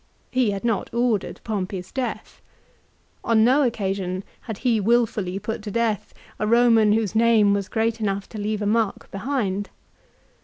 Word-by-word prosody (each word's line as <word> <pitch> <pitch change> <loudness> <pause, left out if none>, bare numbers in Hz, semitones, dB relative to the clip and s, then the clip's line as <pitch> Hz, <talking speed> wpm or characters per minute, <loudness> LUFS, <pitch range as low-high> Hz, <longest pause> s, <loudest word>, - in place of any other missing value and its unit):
He 255 -3 +2
had 200 +2 -3
not 225 -3 -1
ordered 235 -4 0
Pompey's 190 -4 -4
death. 260 -2 -5 0.8
On 225 -1 +3
no 260 +5 +4
occasion 195 -6 -1 0.2
had 220 -4 -6
he 235 -2 +1
wilfully 210 -4 +1
put 220 +3 -4
to 210 - -6
death 225 -2 -1 0.3
a 210 - 0
Roman 230 -2 +5
whose 215 -2 0
name 220 -2 +4
was 200 -1 -2
great 225 0 0
enough 200 -1 -1
to 215 - -7
leave 210 0 -2
a - - -1
mark 220 0 0
behind. 205 -3 -2
215 Hz, 155 wpm, -23 LUFS, 200-230 Hz, 0.8 s, Roman